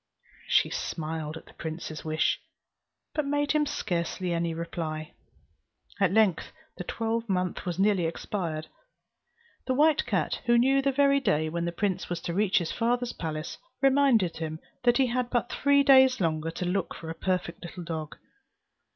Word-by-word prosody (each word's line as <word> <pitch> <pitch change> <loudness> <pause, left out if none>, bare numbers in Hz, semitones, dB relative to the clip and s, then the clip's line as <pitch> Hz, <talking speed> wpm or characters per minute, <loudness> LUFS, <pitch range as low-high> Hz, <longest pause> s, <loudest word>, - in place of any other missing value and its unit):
She - - +3
smiled 160 -1 -4
at - - -12
the - - -17
prince's 160 -1 -6
wish, 155 0 0 0.7
but 305 - 0
made 290 +1 0
him 300 -1 +2
scarcely 175 -2 -2
any 170 0 0
reply. 160 -1 -4 0.9
At 195 -3 +3
length 205 -4 +2 0.2
the - - -5
twelvemonth 220 -4 -2
was 175 -1 -2
nearly 195 -3 +3
expired; 165 -2 -3 1.0
the 260 - +1
white 305 +2 +3
cat, - - 0
who 240 0 +5
knew 270 +3 +4
the 275 0 +2
very 280 +1 +4
day 155 - +1
when 170 +1 -2
the 170 - -1
prince 190 +1 -2
was 175 -1 -2
to 170 - -3
reach 200 +1 +2
his 170 -3 0
father's 240 +1 0
palace, 155 -1 -5 0.2
reminded 265 - +3
him 160 -1 -4 0.3
that 240 0 +5
he 270 - +4
had 250 0 -1
but 240 -1 0
three 280 0 +3
days 265 -2 +6
longer 160 -3 0
to 170 +2 -4
look 180 +1 -1
for 160 -1 -7
a - - -3
perfect 180 -1 -2
little 175 +1 -7
dog. 160 -2 -5
185 Hz, 165 wpm, -28 LUFS, 165-245 Hz, 1.0 s, days